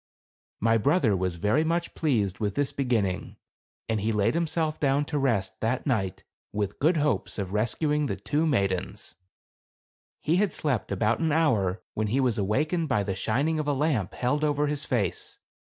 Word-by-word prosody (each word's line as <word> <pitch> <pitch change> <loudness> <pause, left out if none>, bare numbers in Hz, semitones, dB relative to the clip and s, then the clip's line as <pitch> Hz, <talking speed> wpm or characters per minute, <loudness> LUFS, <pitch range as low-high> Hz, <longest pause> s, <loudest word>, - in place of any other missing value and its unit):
My 115 +1 +3
brother 135 - +3
was 90 -1 -1
very 105 - +2
much 170 +1 -1
pleased 110 - 0
with 105 -2 -1
this 145 -1 +1
begin 125 -6 +1
ning, 95 -1 -4 0.5
and 110 -2 0
laid 105 +2 +2
himself 160 -2 -1
down 140 0 +2
to 150 0 -2
rest, 110 -9 0
that 115 +3 -1
night, 95 -8 -1 0.3
with 100 -1 -3
good 160 +4 +3
hopes 150 -1 0
of 100 -2 -4
rescuing 145 +8 +1
the - - -2
two 155 +2 0
maidens. 100 - -1 1.1
He 165 +3 +1
had 200 -3 +1
slept 130 -11 -1
about 105 +4 +1
an 160 -1 +1
hour, 110 - +1
when 110 0 -1
he 120 +6 +1
was 125 -5 +1
awakened 150 - 0
by 105 -6 +2
the 100 -1 -2
shining 140 +11 0
of 150 - -2
a 145 - +2
lamp 135 - 0
held 145 +5 0
over 150 -1 +2
his 150 0 -2
face. 105 -9 -2
130 Hz, 175 wpm, -27 LUFS, 105-150 Hz, 1.1 s, My